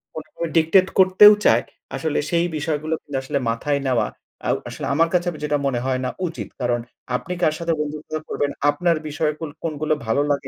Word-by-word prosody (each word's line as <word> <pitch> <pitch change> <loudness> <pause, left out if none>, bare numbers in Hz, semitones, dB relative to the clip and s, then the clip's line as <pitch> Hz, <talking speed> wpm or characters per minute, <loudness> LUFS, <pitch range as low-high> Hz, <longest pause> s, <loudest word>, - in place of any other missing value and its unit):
কোনোভাবে 155 +2 -5
ডিক্টেট 170 +4 +5
করতেও 190 +3 +8
চায়, 115 +2 +5 0.3
আসলে 150 +2 -1
সেই 170 0 +2
বিষয়গুলো 155 0 -2
কিন্তু 140 -2 -4
আসলে 140 +1 -1
মাথায় 140 +5 0
নেওয়া 125 -3 +2 0.4
আ - - +1 0.2
আসলে - - -6
আমার 165 +3 +3
কাছে 175 0 +2 0.2
যেটা 150 0 +1
মনে 125 -3 0
হয় 130 -1 0
না - - 0 0.2
উচিত। 165 - -6
কারণ 120 -1 +1 0.4
আপনি 180 +8 -3
কার 155 - +3
সাথে 170 -1 0
বন্ধুত্ব 150 +1 -5 0.2
করবেন, 145 0 -1 0.2
আপনার 165 +2 +2
বিষয় 150 +1 0
কোন 160 -2 -5
কোনগুলো 155 -1 -1
ভালো 135 +6 +1
লাগে 140 -1 -1
150 Hz, 185 wpm, -22 LUFS, 140-165 Hz, 0.4 s, করতেও